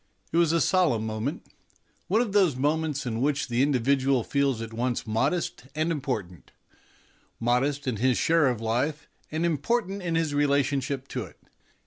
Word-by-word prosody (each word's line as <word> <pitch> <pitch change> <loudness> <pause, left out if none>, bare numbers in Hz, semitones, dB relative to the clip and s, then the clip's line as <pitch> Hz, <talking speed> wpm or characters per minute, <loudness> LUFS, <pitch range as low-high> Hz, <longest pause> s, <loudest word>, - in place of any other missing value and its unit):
It - - 0
was 170 -2 +4
a 170 - +2
solemn 155 - +2
moment 110 +9 -3 0.6
one 215 +5 +3
of 235 -4 -1
those 190 -9 +4
moments 150 +1 0
in 115 -1 -2
which 140 -1 0
the 120 +1 +1
individual 135 -1 +2
feels 140 -3 0
at 115 0 -6
once 120 +1 -1
modest 130 +5 -1
and 155 +2 0
important 110 - -4 0.9
modest 130 +5 +1
in 120 -4 -1
his 125 +2 +2
share 165 -3 +3
of 125 -4 0
life, 130 +7 -1 0.2
and 160 +2 -1
important 195 - 0
in 170 -2 -2
his 160 -3 0
rela 145 -1 +3
tionship 135 -1 -2
to - - -3
it. - - -16
140 Hz, 165 wpm, -26 LUFS, 125-160 Hz, 0.9 s, was